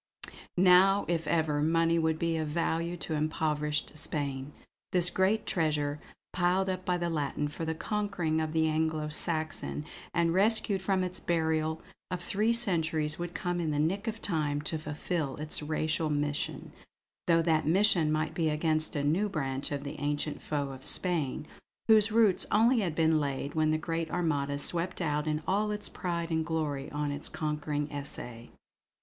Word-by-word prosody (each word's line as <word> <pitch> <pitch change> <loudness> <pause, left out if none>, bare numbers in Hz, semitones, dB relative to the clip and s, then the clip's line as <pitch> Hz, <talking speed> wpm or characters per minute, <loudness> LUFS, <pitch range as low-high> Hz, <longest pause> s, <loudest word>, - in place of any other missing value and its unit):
Now 185 +2 +6
if 165 -2 -1
ever, 155 -3 +1
money 165 +2 +3
would 160 -1 +1
be 165 0 0
of 155 -1 -1
value 170 +2 -1
to 165 - -4
impoverished 150 -1 -1
Spain. 140 -2 -2 0.4
This 180 -1 +2
great 200 +3 +2
treasure, 150 -3 0 0.3
piled 185 +2 +2
up 185 0 -4
by 180 -1 0
the 175 0 -1
Latin 150 -2 -1
for 150 +2 -5
the 160 0 -2
conquering 190 -5 -1
of 155 -1 -2
the 160 0 +2
Anglo 155 -1 0
Saxon, 155 - -2 0.3
and 170 -1 +2
rescued 200 0 +3
from 190 0 +1
its 180 0 -4
burial 160 -1 0 0.3
of 180 - -2
three 210 +6 +1
centuries, 160 -9 +1
would 175 0 -5
come 175 -1 -1
in 165 -2 -1
the 150 - -1
nick 185 +8 0
of 225 0 -4
time 150 -5 0
to 155 +1 -2
fulfill 150 -1 -3
its 155 +1 -3
racial 155 +1 -1
mission; 145 0 -2 0.6
though 165 -1 +4
that 160 -2 +2
mission 175 -3 +4
might 155 +1 0
be 160 -1 +1
against 155 +1 0
a 145 - 0
new 175 +9 +2
branch 135 -6 -3
of 140 -1 -3
the 145 +1 -6
ancient 145 0 -2
foe 145 -2 -2
of 135 0 -10
Spain, 155 -3 -1 0.4
whose 220 -1 +6
roots 215 -4 +3
only 235 +4 +4
had 175 -7 -1
been 160 -1 +3
laid 140 0 -2
when 155 -1 +2
the 155 - +2
great 165 0 -3
Armada 145 -5 0
swept 170 +5 -1
out 150 -3 -1
in 155 0 -1
all 210 +3 +1
its 210 0 -2
pride 170 -2 -3
and 160 0 +1
glory 155 -4 -2
on 145 -1 -2
its 145 +1 -5
conquering 150 -1 -2
essay. 125 -5 -7
160 Hz, 170 wpm, -30 LUFS, 150-175 Hz, 0.6 s, Now